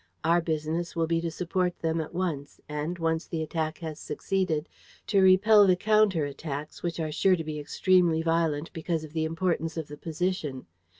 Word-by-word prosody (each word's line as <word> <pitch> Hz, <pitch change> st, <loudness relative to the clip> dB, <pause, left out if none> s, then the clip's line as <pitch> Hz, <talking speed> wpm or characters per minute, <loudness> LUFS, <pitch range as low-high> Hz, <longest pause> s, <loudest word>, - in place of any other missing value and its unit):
Our 170 Hz, +2 st, +3 dB
business 160 Hz, +1 st, -2 dB
will 165 Hz, -1 st, +1 dB
be 165 Hz, 0 st, 0 dB
to 170 Hz, -, -2 dB
support 180 Hz, +1 st, -1 dB
them 165 Hz, 0 st, -1 dB
at 155 Hz, -, -7 dB
once 170 Hz, -6 st, -3 dB
and, 150 Hz, +4 st, -3 dB
once 165 Hz, 0 st, -1 dB
the 160 Hz, -2 st, -2 dB
attack 155 Hz, 0 st, -2 dB
has 155 Hz, -1 st, -6 dB
succeeded, 165 Hz, -1 st, -1 dB, 0.4 s
to 200 Hz, -2 st, +3 dB
repel 200 Hz, +2 st, +6 dB
the 185 Hz, -, +5 dB
counter 210 Hz, -5 st, +3 dB
attacks, 145 Hz, +1 st, -6 dB
which 170 Hz, -1 st, -3 dB
are 155 Hz, -1 st, -2 dB
sure 185 Hz, +5 st, +3 dB
to 165 Hz, -, -4 dB
be 155 Hz, -1 st, -5 dB
extremely 170 Hz, +2 st, +2 dB
violent 165 Hz, -2 st, 0 dB
because 160 Hz, 0 st, -2 dB
of 155 Hz, -1 st, -10 dB
the 160 Hz, -1 st, 0 dB
importance 165 Hz, -1 st, -1 dB
of 160 Hz, -3 st, -4 dB
the 150 Hz, -, -8 dB
position. 160 Hz, -4 st, -3 dB
165 Hz, 185 wpm, -28 LUFS, 155-180 Hz, 0.4 s, repel